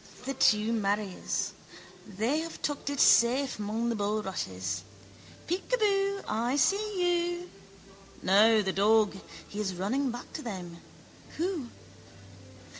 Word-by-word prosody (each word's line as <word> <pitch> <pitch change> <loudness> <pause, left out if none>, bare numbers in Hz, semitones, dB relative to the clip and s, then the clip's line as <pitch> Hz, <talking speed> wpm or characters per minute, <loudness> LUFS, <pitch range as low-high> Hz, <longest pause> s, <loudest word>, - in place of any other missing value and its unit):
The 270 - -2
two 215 -3 +3
maries. 205 -3 -1 0.5
They 225 +10 0
have 330 0 -6
tucked 290 -1 -2
it 285 -1 -3
safe 255 +2 +4
mong 220 +3 -1
the 235 - 0
bulrushes. 185 - -3 0.6
Peekaboo. 395 +1 0
I 235 +5 0
see 355 0 +1
you. 355 - -14 0.7
No, 215 +3 +5
the 190 -1 -1
dog. 210 0 +3 0.3
He 205 - -7
is 190 -3 -2
running 250 +10 0
back 245 +1 -7
to 315 - -5
them. 180 - -7 0.6
Who? 335 -6 -2
230 Hz, 115 wpm, -29 LUFS, 205-310 Hz, 0.7 s, No